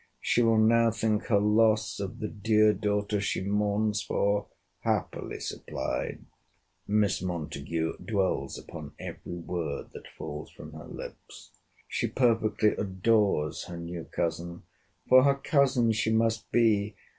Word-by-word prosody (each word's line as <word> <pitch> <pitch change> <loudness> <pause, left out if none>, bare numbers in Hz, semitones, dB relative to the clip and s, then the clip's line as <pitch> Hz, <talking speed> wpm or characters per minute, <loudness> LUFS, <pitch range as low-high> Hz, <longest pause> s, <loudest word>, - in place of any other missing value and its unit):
—She 120 - +2
will 115 -1 +4
now 115 +1 +5
think 110 -1 0
her 105 - +3
loss 105 0 +3
of 100 +3 -4
the 110 -4 -3
dear 110 0 +3
daughter 105 0 -1
she 100 - -1
mourns 105 +1 +1
for 100 0 0 0.3
happily - - -2
supplied!' - - -4 0.6
Miss 105 -2 +2
Montague 80 -2 -3
dwells 100 -4 -1
upon - - -9
every 85 - -7
word 85 -3 -4
that - - -10
falls 75 +1 -6
from - - -12
her - - -10
lips. - - -10 0.4
She - - -1
perfectly 110 -4 +2
adores 95 -5 +1
her 85 - -7
new 85 0 -6
cousin—'For 85 +9 0
her 140 0 +4
cousin 135 -5 +2
she 110 0 0
must 115 0 +1
be. 105 -3 +2
105 Hz, 130 wpm, -28 LUFS, 95-115 Hz, 0.6 s, now